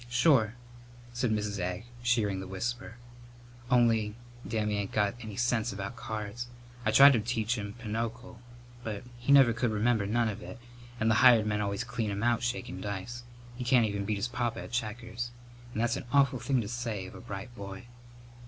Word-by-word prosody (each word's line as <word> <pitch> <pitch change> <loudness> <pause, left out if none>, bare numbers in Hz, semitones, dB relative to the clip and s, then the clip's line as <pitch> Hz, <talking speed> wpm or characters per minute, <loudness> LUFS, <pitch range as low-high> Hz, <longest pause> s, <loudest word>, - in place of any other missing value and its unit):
"Sure," 120 -3 +4 0.6
said 120 0 0
Mrs. 105 -2 -1
Egg, 90 +4 -3 0.2
shearing 115 -5 +1
the 95 - -6
whisper. 115 +4 -4 0.7
"Only 115 -4 +3 0.3
Dammy 105 -2 0
ain't 100 -1 -3
got 105 -1 +1
any 110 -3 -7
sense 120 0 +1
about 100 +3 -5
cards. 110 0 -5 0.4
I 110 - +1
tried 140 +6 +9
to 115 - +3
teach 115 +1 0
him 100 -2 -5
pinochle, 115 +1 -5 0.4
but 105 -3 -4 0.2
he 120 +3 0
never 135 -4 +7
could 120 +1 0
remember 110 -1 +1
none 115 +2 +2
of 110 0 -4
it, - - -8 0.4
and 110 0 +3
the 110 - +4
hired 115 -3 +7
men 105 -1 0
always 100 +1 -1
clean 120 -3 -2
him 100 +1 -2
out 120 0 +2
shakin' 120 -6 -3
dice. 105 +4 -5 0.3
He 125 - -5
can't 125 -2 +4
even 100 -2 -2
beat 105 0 -1
his 100 +4 -1
papa 120 -1 -2
at - - -10
checkers. 120 0 -3 0.4
And 110 - -4
that's 120 - +1
an - - -7
awful 140 -3 +4
thing 130 -1 +1
to 105 - -5
say 115 -4 -3
of 95 - -10
a - - -10
bright 105 0 -7
boy!" 100 -1 -8
115 Hz, 190 wpm, -30 LUFS, 105-120 Hz, 0.7 s, tried